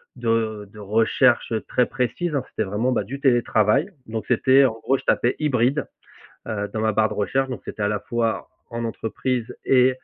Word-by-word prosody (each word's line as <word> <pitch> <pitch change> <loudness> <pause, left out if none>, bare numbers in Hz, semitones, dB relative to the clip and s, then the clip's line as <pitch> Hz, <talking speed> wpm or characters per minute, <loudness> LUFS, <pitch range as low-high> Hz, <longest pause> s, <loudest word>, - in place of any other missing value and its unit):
de 110 -3 -1
de - - -16
recherches 115 +5 +2 0.2
très 125 - +2
précises, 125 +7 -2
hein, 135 - 0
c'était - - -2
vraiment, 105 +6 -1
bah, 120 - +1
du 135 +8 -7
télétravail, 120 - +3 0.2
donc 110 0 -4
c'était, 130 +3 +5
en 120 - +1
gros, 135 +4 +1
je - - -11
tapais 120 - +2
«hybride», 140 -1 +1 0.6
heu, 105 -1 -2
dans 110 - -2
ma 110 0 +1
barre 110 0 +2
de - - -4
recherche 130 +7 0
donc 120 -7 -5
c'était 105 - -6
à 105 - +2
la 105 -1 -1
fois 115 -1 -2 0.2
en 115 0 -4
entreprise 115 +2 -3
et 130 -1 +5
115 Hz, 190 wpm, -23 LUFS, 110-130 Hz, 0.6 s, c'était